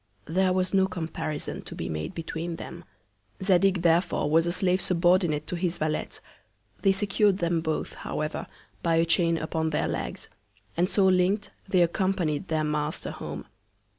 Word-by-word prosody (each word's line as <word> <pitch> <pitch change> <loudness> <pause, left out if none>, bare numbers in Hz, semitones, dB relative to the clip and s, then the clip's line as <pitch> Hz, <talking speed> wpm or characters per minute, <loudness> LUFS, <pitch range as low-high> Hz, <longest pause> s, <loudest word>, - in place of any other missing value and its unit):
There 185 +4 +2
was 185 +1 0
no 190 -1 +4
Comparison 160 -4 -4
to - - -7
be - - -4
made 80 -1 -4
between 165 +1 -4
them. - - -9 0.6
Zadig 190 -1 +3
therefore 170 -3 +2
was 165 +2 +4
a - - +1
Slave 185 +1 +1
subordinate 175 -4 +2
to 180 - -2
his 175 0 -1
Valet; 155 0 -1 0.7
they 195 - +5
secur'd 200 0 +2
them 170 -2 0
both, 160 -1 -2
however, 155 0 -4 0.3
by 165 -1 +2
a 165 +1 +4
Chain 170 0 +3
upon 160 0 -1
their 150 - 0
Legs; - - -4 0.5
and 175 +2 +2
so 195 - +3
link'd 190 +3 +2 0.2
they 185 -2 +4
accompanied 175 -2 0
their 155 -1 0
Master 150 0 -2
home. - - -6
170 Hz, 160 wpm, -27 LUFS, 160-185 Hz, 0.7 s, they